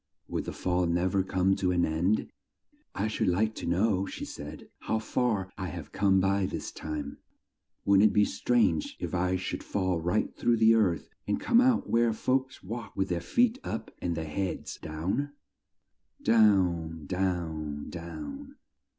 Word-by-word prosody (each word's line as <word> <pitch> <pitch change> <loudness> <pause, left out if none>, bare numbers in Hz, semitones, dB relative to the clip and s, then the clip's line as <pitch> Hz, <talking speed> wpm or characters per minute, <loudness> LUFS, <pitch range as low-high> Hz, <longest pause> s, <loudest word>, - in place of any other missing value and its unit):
Would - - -2
the - - -4
fall 90 -1 0
nev 85 +3 +1
er 95 - +4
come 95 0 +2
to 95 - +1
an 90 -1 +2
end? 85 +7 0 0.6
"I 100 - 0
should 110 - -1
like 105 +5 +2
to - - -6
know," 95 +2 +2
she - - -6
said, 75 +1 -8
"how 110 - -1
far 110 -4 -1
I 95 - -2
have 80 - -7
come 95 -1 +3
by 95 0 +2
this - - -5
time. 75 -2 -5 0.7
Wouldn't 100 +2 +6
it - - -4
be 105 +1 +4
strange 110 -10 +1
if - - -4
I 90 +1 +1
should 95 - -3
fall 95 -3 0
right 90 +6 0
through 120 -1 +2
the 110 0 +6
earth 95 -9 +1 0.2
and 105 - 0
come 240 0 +4
out 255 -2 +3
where 115 0 +3
the - - 0
folks 130 +1 -1
walk 115 +4 -6
with 95 -1 0
their 85 -1 -1
feet 245 +1 +2
up 110 0 -4
and 85 -1 -1
their 80 -1 -3
heads 90 +3 -3
down?" 95 - -2 0.9
Down, 90 -8 +3
down, 80 -5 -2
down. 275 - -7
95 Hz, 170 wpm, -29 LUFS, 85-110 Hz, 0.9 s, Wouldn't